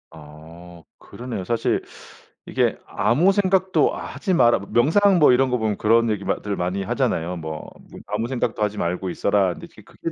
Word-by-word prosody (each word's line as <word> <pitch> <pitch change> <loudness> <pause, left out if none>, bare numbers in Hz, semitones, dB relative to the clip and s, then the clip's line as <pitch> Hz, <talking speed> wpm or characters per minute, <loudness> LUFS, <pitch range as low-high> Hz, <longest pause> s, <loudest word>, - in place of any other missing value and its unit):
아 80 +2 -14 0.2
그러네요. 120 -5 -7
사실 115 +3 0 0.6
이게 - - 0
아무 125 - +2
생각도 190 -1 +2
하지 190 - -4
마라 120 -9 +4
명상 180 +10 +3
뭐 150 - +6
이런 130 +1 +2
거 125 - +1
보면 110 -3 -1
그런 115 +2 +3
얘기마 105 -2 -2
들 105 -1 -3
많이 90 +2 -2
하잖아요. 90 -1 -1
뭐 80 -1 -6 0.3
뭐 - - -11
"아무 105 +3 -2
생각도 120 -3 -2
하지 105 0 -2
말고 90 +1 -2
있어라." 95 0 +1
근데 - - -11 0.2
그게 165 - -7
105 Hz, 330 characters per minute, -22 LUFS, 90-130 Hz, 0.6 s, 뭐